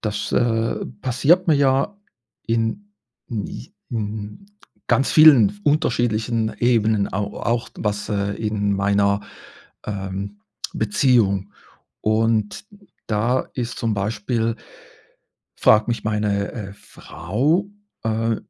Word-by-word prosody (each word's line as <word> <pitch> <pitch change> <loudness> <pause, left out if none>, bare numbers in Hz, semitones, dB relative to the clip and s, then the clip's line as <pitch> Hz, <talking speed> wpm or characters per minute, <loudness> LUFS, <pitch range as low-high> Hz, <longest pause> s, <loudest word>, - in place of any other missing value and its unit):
Das, 105 -1 -3
äh, 115 -1 +1 0.2
passiert 150 +8 +2
mir 155 - +6
ja 140 +8 +2 0.5
in 115 - -1 0.3
in 110 -4 -4
j - - -9 0.2
in 105 - -5 0.4
ganz 130 +3 +2
vielen 145 -10 +8
f 105 0 -12
unterschiedlichen 115 -7 +1
Ebenen 110 -4 +2
au 105 +1 -3
auch 115 0 -1
was, 105 0 -2
äh 100 -1 -1
in 105 -2 -1
meiner, 100 +1 +2 0.7
ähm, 100 0 -5 0.3
Beziehung. 105 -3 +2 0.5
Und 110 - 0 0.4
da 115 +4 0
ist 120 -1 -4
zum 115 -2 0
Beispiel 110 +3 -1 1.0
fragt 110 +1 +4
mich 115 -3 -2
meine, 105 -2 -1
äh, 100 -4 -7
Frau 110 - -2 0.4
äh, 115 0 0
110 Hz, 105 wpm, -22 LUFS, 105-120 Hz, 1.0 s, vielen